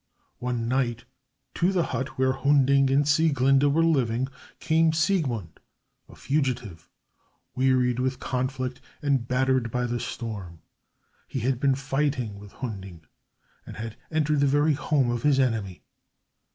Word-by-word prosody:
One 120 Hz, -2 st, -2 dB
night 120 Hz, -2 st, -1 dB, 0.5 s
to 180 Hz, +3 st, +1 dB
the 180 Hz, -3 st, +1 dB
hut 130 Hz, 0 st, -4 dB
where 130 Hz, 0 st, +3 dB
Hunding 140 Hz, 0 st, +3 dB
and 140 Hz, +2 st, +3 dB
Sieglinde 140 Hz, -3 st, +3 dB
were 165 Hz, +3 st, +3 dB
living 130 Hz, -5 st, +1 dB, 0.3 s
came 160 Hz, 0 st, +2 dB
Siegmund, 150 Hz, -, -1 dB, 0.5 s
a -, -, -14 dB
fugitive, 125 Hz, -, -2 dB, 0.6 s
wearied 125 Hz, -1 st, +2 dB
with 130 Hz, 0 st, -1 dB
conflict, 130 Hz, 0 st, -3 dB, 0.2 s
and 135 Hz, -5 st, +1 dB
battered 130 Hz, -1 st, +1 dB
by 125 Hz, +2 st, -1 dB
the 120 Hz, 0 st, -2 dB
storm. 100 Hz, -11 st, -6 dB, 0.6 s
He 130 Hz, -, -4 dB
had 125 Hz, +1 st, 0 dB
been 135 Hz, -1 st, +2 dB
fighting 135 Hz, -6 st, -2 dB
with 100 Hz, -1 st, -12 dB
Hunding, 95 Hz, -9 st, -7 dB, 0.6 s
and -, -, -10 dB
had 110 Hz, 0 st, -6 dB
entered 150 Hz, -2 st, +1 dB
the 140 Hz, -, +3 dB
very 145 Hz, +3 st, +3 dB
home 140 Hz, -3 st, +1 dB
of 120 Hz, -1 st, -2 dB
his 140 Hz, 0 st, +3 dB
enemy. 110 Hz, -8 st, -1 dB
130 Hz, 140 wpm, -26 LUFS, 120-140 Hz, 0.6 s, where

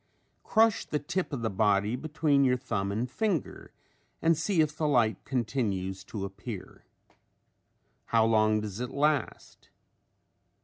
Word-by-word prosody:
Crush 225 Hz, -1 st, +3 dB
the 150 Hz, -, -2 dB
tip 175 Hz, +5 st, -3 dB
of 130 Hz, -5 st, -4 dB
the 110 Hz, -, +1 dB
body 105 Hz, +2 st, +2 dB
between 145 Hz, 0 st, +1 dB
your 125 Hz, -1 st, +3 dB
thumb 100 Hz, -6 st, -2 dB
and 110 Hz, +5 st, -1 dB
finger 180 Hz, -, -2 dB, 0.5 s
and 165 Hz, 0 st, +3 dB
see 160 Hz, +3 st, 0 dB
if 150 Hz, -1 st, +2 dB
the 155 Hz, -1 st, 0 dB
light 120 Hz, -6 st, +2 dB
continues 105 Hz, -7 st, -2 dB
to 100 Hz, -3 st, -5 dB
appear. 100 Hz, +1 st, -8 dB, 1.2 s
How 115 Hz, -1 st, +3 dB
long 110 Hz, -1 st, +3 dB
does 105 Hz, 0 st, -6 dB
it 125 Hz, 0 st, -3 dB
last? 145 Hz, -2 st, -1 dB
125 Hz, 135 wpm, -29 LUFS, 105-150 Hz, 1.2 s, Crush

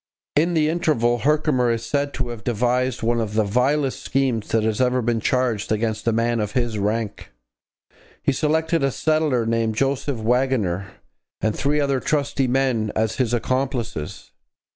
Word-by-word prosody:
In 170 Hz, +4 st, +2 dB
the 155 Hz, -1 st, +3 dB
interval 150 Hz, -8 st, +1 dB
Herkimer 145 Hz, -2 st, +2 dB
is 115 Hz, 0 st, -1 dB
said 140 Hz, +3 st, -1 dB
to 125 Hz, -2 st, -3 dB
have 115 Hz, -2 st, -7 dB
devised 125 Hz, +2 st, 0 dB
one 115 Hz, +1 st, +1 dB
of 110 Hz, -1 st, -4 dB
the 110 Hz, -, +3 dB
vilest 130 Hz, +6 st, +1 dB
schemes 130 Hz, -5 st, 0 dB
that 115 Hz, -1 st, +1 dB
has 110 Hz, +1 st, 0 dB
ever 125 Hz, 0 st, +2 dB
been 115 Hz, -1 st, 0 dB
charged 120 Hz, -3 st, 0 dB
against 110 Hz, +1 st, -1 dB
a -, -, +4 dB
man 115 Hz, +1 st, +1 dB
of 105 Hz, -1 st, -2 dB
his 120 Hz, -4 st, -1 dB
rank. 105 Hz, +1 st, -2 dB, 0.9 s
He -, -, +3 dB
selected 160 Hz, +2 st, +1 dB
a 135 Hz, -, +3 dB
settler, 155 Hz, -4 st, +1 dB
named 115 Hz, -1 st, 0 dB
Joseph 135 Hz, +1 st, 0 dB
Waggoner, 110 Hz, -6 st, 0 dB, 0.5 s
and 110 Hz, -1 st, 0 dB
three 150 Hz, +2 st, +1 dB
other 140 Hz, -2 st, +1 dB
trusty 140 Hz, -2 st, 0 dB
men 125 Hz, -4 st, +1 dB
as 110 Hz, 0 st, 0 dB
his 125 Hz, -3 st, +1 dB
accomplices. 120 Hz, -, -2 dB
125 Hz, 165 wpm, -22 LUFS, 110-135 Hz, 0.9 s, a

